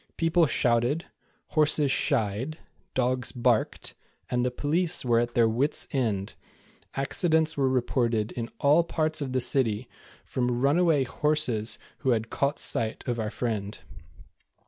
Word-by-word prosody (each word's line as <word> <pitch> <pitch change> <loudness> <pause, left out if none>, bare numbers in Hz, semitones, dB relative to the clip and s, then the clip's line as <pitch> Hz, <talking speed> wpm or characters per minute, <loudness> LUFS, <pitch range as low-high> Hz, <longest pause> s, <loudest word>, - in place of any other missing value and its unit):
People 165 0 +3
shouted, 120 +7 +1 0.4
horses 150 -2 +3
shied, 115 +10 -1 0.4
dogs 130 0 0
barked, 120 -3 0 0.4
and 125 0 +1
the 125 - +1
police 160 +6 -1
were 120 -2 +3
at 120 +1 -2
their 115 -2 +5
wit's 125 +7 +1
end. 110 -8 -1 0.6
Accidents 160 +3 +1
were 135 -2 +2
reported 120 -3 0
in 115 -1 -5
all 150 +4 +4
parts 155 -2 -1
of 135 -2 -3
the 130 - +1
city, 120 -3 0 0.4
from 125 -1 -1
runaway 150 +2 +3
horses 130 -6 0 0.2
who 135 - -1
had 115 0 -2
caught 140 +2 0
sight 110 -1 -1
of 120 -1 -1
our 110 -1 -1
friend. 110 -4 -3
130 Hz, 135 wpm, -27 LUFS, 115-150 Hz, 0.6 s, their